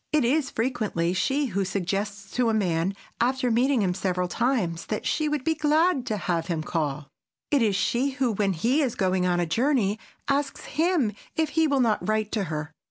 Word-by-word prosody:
It 300 -5 +3
is 275 +3 +2
frequently 215 -8 -1
she 275 +10 +1
who 195 +1 +1
suggests 200 +2 -3
to 245 -2 +1
a 220 - +1
man, 180 -2 0 0.2
after 250 +1 +1
meeting 245 0 +3
him 180 -2 +1
several 180 -1 -1
times, 205 -6 -1
that 215 - -3
she 305 -1 +1
would 295 -3 -1
be 320 - +2
glad 310 -2 +2
to 215 -3 -1
have 170 -3 -1
him 165 -3 -2
call. 150 -3 -2 0.4
It 285 -3 +3
is 210 -4 +2
she 240 +7 +1
who, 255 -3 +2
when 200 -2 +1
he 240 - +1
is 260 -5 0
going 185 -1 +1
on 175 -1 +1
a 175 - +1
journey, 220 - +1 0.3
asks 280 0 -1
him 320 - +1 0.2
if 320 -1 +1
he 320 +1 +2
will 280 -2 +2
not 220 -3 +1
write 215 -1 0
to 210 -3 0
her. 155 -1 -4
220 Hz, 200 wpm, -26 LUFS, 185-275 Hz, 0.4 s, It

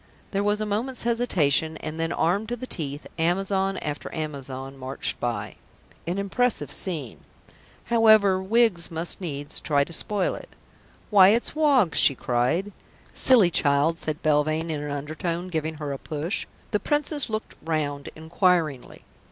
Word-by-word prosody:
There 195 - 0
was 205 +1 +1
a 215 - -1
moment's 225 +5 -2
hesitation, 160 - +1
and 155 +1 -6
then, 165 0 -1
armed 200 +8 0
to 240 - -1
the 245 - -7
teeth, 145 - -5
Amazon 195 +3 0
after 145 -1 -5
Amazon 135 -3 -6
marched 135 0 -3
by.... 105 -4 -3 0.5
An 175 +3 -1
impressive 225 +5 0
scene.... 155 - -3 0.6
However, 220 -5 +4
Wiggs 200 -4 +2
must 165 +3 -2
needs 145 -5 -4
try 145 -2 +1
to 170 - -9
spoil 200 +3 -1
it. - - -9 0.6
"Why, 195 -3 +8
it's 230 +7 +1
Woggs!" 280 - +3
she 140 - +5
cried. 125 +13 0 0.4
"Silly 225 -9 +5
child!" 145 +2 +2
said 155 0 -2
Belvane 155 +2 +1
in 150 -2 -3
an 150 - -5
undertone, 155 +5 -4
giving 160 -2 -3
her 150 -2 -4
a 135 - -6
push. 155 +6 -3 0.2
The 210 - +1
Princess 295 0 +3
looked 215 0 -4
round 145 -3 -2
inquiringly. 160 -4 0
165 Hz, 150 wpm, -25 LUFS, 150-205 Hz, 0.6 s, Why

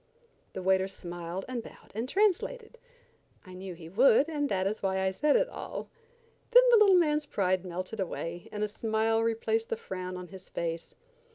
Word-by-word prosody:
The 185 - -5
waiter 190 0 +3
smiled 175 -1 -6
and 255 -2 -3
bowed - - -15
and 225 +5 -3
translated. 430 +5 0 0.7
I 185 - -11
knew 185 0 -7
he 165 -1 -11
would, 240 - +5
and 295 -3 -1
that 190 -1 0
is 205 +2 -2
why 190 -1 0
I 190 0 +1
said 290 +9 +2
it - - +3
all. - - -7 0.6
Then - - +8
the 470 - +8
little 405 -3 +6
man's 300 -4 +2
pride 185 -5 0
melted 185 +4 -5
away, 175 -2 -4
and 210 0 -3
a - - +1
smile 220 +1 0
replaced 335 - 0
the 460 - -1
frown 185 - -6
on 180 -1 -8
his 190 -1 -12
face. 165 -1 -4
205 Hz, 185 wpm, -29 LUFS, 185-295 Hz, 0.7 s, Then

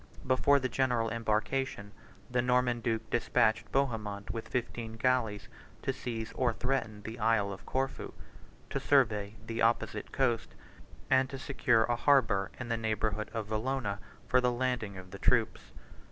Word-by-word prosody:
Before 130 +2 +4
the 130 - -1
general 125 -3 +1
embarkation, 110 0 -1 0.4
the 125 0 +1
Norman 125 -1 +2
duke 115 -1 -1
despatched 120 -2 +2
Bohemond 110 -7 -1
with 115 -1 -5
fifteen 115 -2 -3
galleys 115 -4 0 0.4
to 135 - 0
seize 115 -4 -5
or 125 -3 +1
threaten 115 -4 -2
the 115 +2 -7
Isle 110 -3 +2
of 95 - -12
Corfu, 135 0 -2 0.6
to - - -1
survey 110 -7 +2
the 115 0 -3
opposite 115 +1 +1
coast, - - 0 0.6
and 130 0 +4
to 135 - -6
secure 130 -4 +2
a 120 - +1
harbor 115 -8 +3
in 125 - -5
the 115 - +1
neighborhood 110 -1 -1
of 110 -2 -4
Vallona 110 -2 -1 0.3
for 125 - +4
the 125 0 +2
landing 120 -5 -1
of 90 0 -10
the 100 - -8
troops. - - +1
115 Hz, 155 wpm, -31 LUFS, 110-130 Hz, 0.6 s, Before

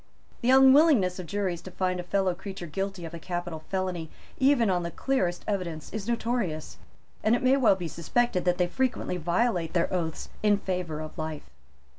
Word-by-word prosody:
The 240 - +1
unwillingness 265 - +6
of 180 - -6
juries 190 -3 -2
to - - -9
find 185 0 -1
a - - -3
fellow 190 0 +1
creature 190 0 -7
guilty 195 +2 -4
of 165 - -8
a 170 - -6
capital 175 -1 -4
felony 185 -4 -2 0.3
even 265 -4 +4
on 180 -1 +1
the 170 - -3
clearest 180 -5 -1
evidence 175 -6 -3
is 210 -1 -4
notorious; 230 -9 -2 0.5
and 220 +2 +4
it 245 - -2
may 260 +1 +5
well 250 -7 +4
be 180 -3 -4
suspected 180 +5 0
that 180 0 +2
they 180 - +3
frequently 245 -2 -1
violate 175 0 0
their 170 0 +1
oaths 165 -3 -2
in 210 -1 +4
favour 180 -5 -3
of 155 - -8
life. 155 -1 -5
185 Hz, 185 wpm, -27 LUFS, 170-225 Hz, 0.5 s, unwillingness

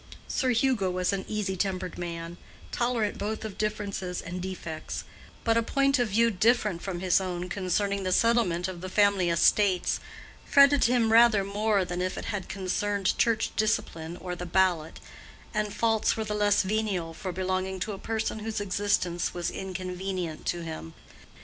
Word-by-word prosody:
Sir 260 - 0
Hugo 235 -5 +2
was 180 +2 0
an 195 -1 -3
easy 205 -3 -2
tempered 185 -1 -2
man, 170 0 -5 0.3
tolerant 235 -4 0
both 215 +2 -3
of 210 -3 -7
differences 200 -4 -2
and 180 +1 -5
defects; 175 -4 -5 0.4
but 230 0 +3
a - - +4
point 275 +3 +2
of 245 - +2
view 230 +3 +3
different 210 -3 +2
from 180 -3 -4
his 185 0 +3
own 180 -1 -4
concerning 200 +2 0
the 185 -1 -1
settlement 190 -6 +2
of 180 -2 -7
the 185 - -5
family 200 -2 +3
estates 185 +2 +3 0.4
fretted 280 0 +6
him 235 -2 +3
rather 225 -3 +6
more 200 0 +1
than 175 0 -3
if 185 0 -2
it - - -5
had 205 -3 -4
concerned 195 +1 -1
Church 225 -1 +2
discipline 170 -6 -1
or 180 -1 -5
the 180 0 -6
ballot, 175 -3 +1 0.5
and 210 -1 -1
faults 225 0 +1
were 220 - -1
the 210 - -3
less 205 -1 +3
venial 190 -5 -1
for 185 +3 -5
belonging 185 +1 -2
to 215 - -2
a 195 - -6
person 220 0 -2
whose 220 0 -3
existence 190 -4 0
was 175 -1 -2
inconvenient 185 -2 -4
to 175 -1 -1
him. 155 - -7
195 Hz, 170 wpm, -28 LUFS, 180-215 Hz, 0.5 s, fretted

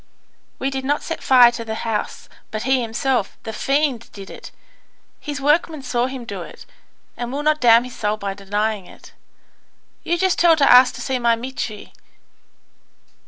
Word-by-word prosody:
"We 270 - -2
did 265 -1 -4
not 290 +2 -1
set 330 - -5
fire 250 -2 +6
to 235 -1 -6
the 220 -1 -5
house, 225 -2 -3 0.2
but 215 0 -4
he 265 0 +2
himself, 235 0 -1
the 220 - -6
fiend, 275 -2 -1
did 195 -1 -10
it; - - -10 0.7
his 290 -2 -5
workman 300 +1 +1
saw 245 -1 0
him 260 -2 -7
do - - -6
it, - - -11 0.5
and 240 0 -5
will 285 +2 -3
not 305 0 +1
damn 235 -1 +6
his 250 0 -10
soul 210 0 -1
by 200 -2 -4
denying 205 0 -2
it. - - -16 0.9
You 345 - 0
just 375 0 +1
tell 340 -1 +6
to 285 -3 +3
ask 250 0 +7
to - - -8
see 260 -2 -2
my 235 -1 +3
Mitri. 230 -3 -6
250 Hz, 175 wpm, -21 LUFS, 225-275 Hz, 0.9 s, ask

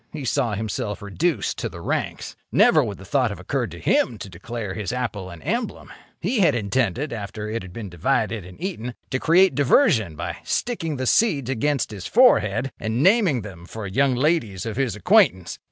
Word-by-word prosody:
He 150 -4 -6
saw 115 -2 0
himself 105 -1 -4
reduced 120 - -1
to - - -2
the - - -10
ranks. - - -3 0.2
Never - - +5
would - - -4
the - - -12
thought - - +1
have - - -7
occurred - - -2
to - - -10
him 115 - +1
to 100 - -8
declare 100 +3 -6
his 105 0 -4
apple 110 -7 -3
an 85 -2 -11
emblem. 230 - -3 0.3
He 250 - -1
had 170 -9 +4
intended, 120 - -1
after 105 -1 -5
it 115 +2 -3
had 95 - -10
been 105 +2 -7
divided 105 - -1
and 90 +7 -13
eaten, 140 - -4 0.2
to 130 - 0
create 175 +3 +4
diversion 130 - +3
by - - -5
sticking 165 -11 -2
the 130 - -2
seeds 140 - +2
against 135 0 0
his 100 -4 -6
forehead 135 - +4
and 110 +5 -1
naming 185 - +4
them 90 -4 -10
for 110 +1 -7
young 130 +7 +1
ladies 120 - 0
of 110 -2 -4
his 125 -5 -1
acquaintance. 175 - +3
120 Hz, 190 wpm, -23 LUFS, 100-150 Hz, 0.3 s, Never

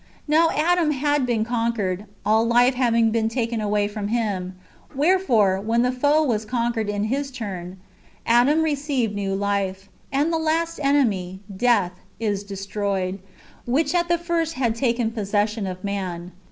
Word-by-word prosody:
Now 320 +2 +4
Adam 335 +1 +2
had 290 -1 +1
been 225 -3 0
conquered, 225 -5 -1 0.2
all 220 +1 +4
life 240 +2 +4
having 235 -3 +2
been 220 0 +1
taken 230 -1 -2
away 205 -1 +1
from 205 -1 -4
him: 205 -5 -2 0.4
wherefore, 265 - +3
when 230 +3 +1
the 250 - +2
foe 290 +5 +2
was 225 -7 0
con 235 +1 -1
quered 220 -2 -2
in 205 0 -1
his 275 +6 -1
turn, 190 -8 -6 0.5
Adam 255 +7 +4
received 280 -7 -1
new 195 -1 -2
life; 195 -1 -2 0.2
and 290 +5 +1
the 325 - +1
last 330 +1 0
enemy, 210 -10 +1
death, 235 -4 +2 0.3
is 205 -3 -1
destroyed,^ 195 -1 -3 0.5
which 310 +6 +1
at 345 -1 +1
the 345 0 +2
first 335 -1 -1
had 240 -4 +1
taken 235 -1 0
possession 210 -1 -1
of 185 0 -6
man. 185 -3 -4
230 Hz, 155 wpm, -23 LUFS, 200-275 Hz, 0.5 s, Now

